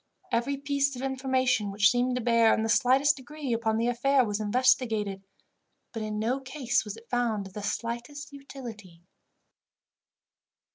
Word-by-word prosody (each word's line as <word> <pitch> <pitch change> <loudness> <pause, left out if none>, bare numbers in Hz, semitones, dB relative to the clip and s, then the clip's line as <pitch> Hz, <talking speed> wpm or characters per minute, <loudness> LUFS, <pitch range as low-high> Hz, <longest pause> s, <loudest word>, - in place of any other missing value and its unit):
Every 265 +4 0
piece 280 -1 0
of 250 - -6
information 260 -5 0
which 200 +1 +4
seemed 250 +1 +1
to 250 - -1
bear, 230 -1 +4
in 220 - -1
the 225 - -1
slightest 270 +5 +4
degree, 275 0 -5
upon 225 -1 0
the 230 - 0
affair 255 +2 +2
was 205 -1 -2
investigated, 220 -3 +1 0.7
but 225 - -4
in 215 0 -3
no 235 +5 0
case 265 -2 -1
was 210 0 -7
it 230 +1 -16
found 235 -5 -1
of 190 - -11
the 210 - -6
slightest 240 +7 -5
utility. 225 -11 -10
245 Hz, 155 wpm, -28 LUFS, 220-265 Hz, 0.7 s, which